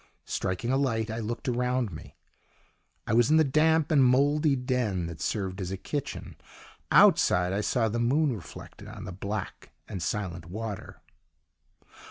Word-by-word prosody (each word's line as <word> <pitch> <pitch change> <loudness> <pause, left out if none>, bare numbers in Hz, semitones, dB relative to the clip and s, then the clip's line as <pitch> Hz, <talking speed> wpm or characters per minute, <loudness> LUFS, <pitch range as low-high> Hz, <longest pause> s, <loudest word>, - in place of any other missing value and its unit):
Striking 100 +6 -2
a 135 - +2
light, 115 -5 0
I 115 - -3
looked 115 +5 -5
around 125 -2 0
me: 80 - -11 0.9
I - - -1
was 120 +3 +4
in 155 - +5
the 160 - +6
damp 155 +2 +2
and 145 -4 +5
mouldy 145 +4 +3
den 125 -8 -1
that 85 -2 -7
served 95 -2 -2
as 90 - -3
a 95 - -4
kitchen; 140 +9 -5 0.5
outside 90 +1 +5
I 100 - 0
saw 115 +1 +1
the 115 +2 -2
moon 135 +3 +2
reflected 90 -7 -11
on - - -9
the - - -6
black 100 +4 -5 0.2
and 95 - -6
silent 90 -4 -3
water. 105 +2 -7
115 Hz, 160 wpm, -28 LUFS, 95-135 Hz, 0.9 s, the